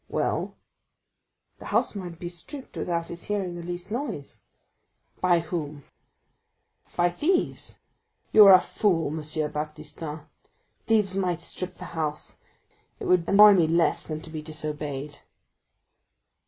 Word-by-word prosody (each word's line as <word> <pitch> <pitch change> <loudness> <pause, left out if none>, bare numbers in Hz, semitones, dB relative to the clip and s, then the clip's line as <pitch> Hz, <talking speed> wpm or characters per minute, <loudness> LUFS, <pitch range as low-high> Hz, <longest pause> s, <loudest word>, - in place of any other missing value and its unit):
"Well?" - - -1 1.0
"The - - -11
house - - +1
might 180 -5 -7
be 175 - -6
stripped 180 - -8
without 170 -1 -2
his 170 0 -6
hearing 195 -4 -2
the 175 - -6
least 175 +3 -6
noise." 150 - -4 0.8
"By 175 -2 +4
whom?" 155 -4 -5 1.1
"By 175 0 +3
thieves." 340 - -1 0.5
"You 210 -2 +9
are 195 - +10
a 185 - +9
fool, 175 -8 +1
M. 155 +2 -4 0.3
Baptistin. 150 +1 -6 0.7
Thieves 210 -4 +2
might 180 -3 0
strip 180 +1 -5
the 180 - -9
house—it 155 -2 -7
would 180 -2 +2
annoy 205 +1 +9
me 175 -5 +4
less 170 +1 +2
than 155 -2 -5
to 160 - -10
be 155 -1 -5
disobeyed." 150 -2 -5
170 Hz, 125 wpm, -26 LUFS, 155-185 Hz, 1.1 s, are